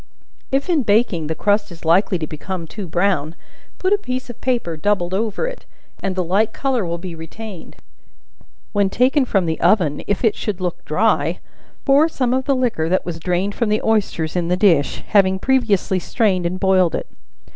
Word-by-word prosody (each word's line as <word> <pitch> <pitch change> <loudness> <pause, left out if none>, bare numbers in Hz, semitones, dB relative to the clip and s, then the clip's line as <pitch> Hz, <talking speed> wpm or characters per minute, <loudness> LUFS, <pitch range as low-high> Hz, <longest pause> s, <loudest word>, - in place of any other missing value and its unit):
If 275 +4 0
in 335 -5 +2
baking, 205 - +1
the 160 - -2
crust 205 +1 +1
is 165 -1 -12
likely 185 +3 +3
to 160 - -3
become 165 +3 -6
too 195 +3 -7
brown, 170 -3 0 0.4
put 375 +2 +1
a 410 - +2
piece 255 -7 -4
of 240 - -16
paper 240 -10 -1
doubled 180 +1 0
over 215 - -1
it, - - -7 0.3
and 190 -1 -2
the 185 - 0
light 205 +6 +1
color 265 -5 0
will 170 0 -2
be 175 0 -7
retained; 170 +4 -9 1.0
when 200 -2 +2
taken 260 +6 +2
from 195 -7 +1
the 160 -1 -2
oven, 165 -9 +3
if 205 +2 -1
it 220 - +3
should 205 -4 -3
look 180 -2 -3
dry, 170 -2 +1 0.5
pour 285 +4 +5
some 255 -5 0
of 260 0 0
the 275 - +2
liquor 235 -11 0
that 185 - +1
was 165 -2 -5
drained 180 +4 -1
from 230 0 -1
the 215 +1 +1
oysters 200 -8 0
in 175 -1 0
the 180 +1 +1
dish, 170 -9 +2
having 190 -2 +4
previously 210 -5 +1
strained 185 -3 +1
and 185 +2 -4
boiled 185 -3 +3
it. - - -4
195 Hz, 190 wpm, -20 LUFS, 175-230 Hz, 1.0 s, pour